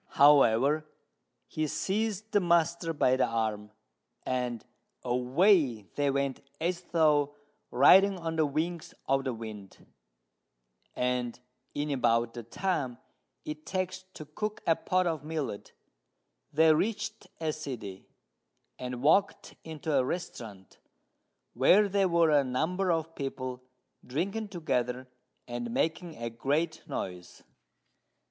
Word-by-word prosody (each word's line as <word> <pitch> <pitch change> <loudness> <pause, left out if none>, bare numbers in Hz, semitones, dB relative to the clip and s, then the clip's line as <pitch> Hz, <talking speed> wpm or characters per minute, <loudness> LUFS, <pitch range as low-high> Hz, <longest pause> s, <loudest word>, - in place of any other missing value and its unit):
However, 145 +1 +5 0.6
he 155 0 -2
seized 215 +5 -2
the 205 - +4
master 170 -1 +2
by 130 -4 +2
the 130 - +2
arm, 110 -2 -2 0.6
and 125 -3 -2 0.4
away 125 - +3
they 145 -1 +1
went 140 -1 -1 0.2
as 175 +2 -1
though 150 -4 +2 0.3
riding 190 +9 +6
on 165 -2 -4
the 155 -2 +2
wings 160 +4 -3
of 135 0 +1
the 130 - -1
wind; 110 -4 -9 1.1
and, 125 -1 -1 0.4
in 145 +1 -2
about 115 -3 +1
the 120 - -6
time 135 - -2 0.5
it 150 0 -6
takes 185 0 -3
to 155 - -8
cook 210 +8 -5
a 165 - +4
pot 185 +2 0
of 160 -4 -1
millet, 150 -9 -4 0.8
they 160 +1 +5
reached 210 +3 -2
a 160 -2 -1
city, 120 -11 -7 0.7
and 125 0 -5
walked 195 +7 +2
into 160 -1 -4
a 135 -2 +4
restaurant, 115 - -6 0.7
where 185 - +5
there 195 -1 +2
were 170 -2 +4
a 145 -2 +5
number 175 +9 0
of 165 0 -1
people 130 -3 -5 0.4
drinking 195 - -2
together 130 -9 -2 0.4
and 120 -1 -4
making 160 +6 -1
a 115 0 -5
great 145 +8 -1
noise. 90 -1 -6
150 Hz, 120 wpm, -29 LUFS, 125-170 Hz, 1.1 s, riding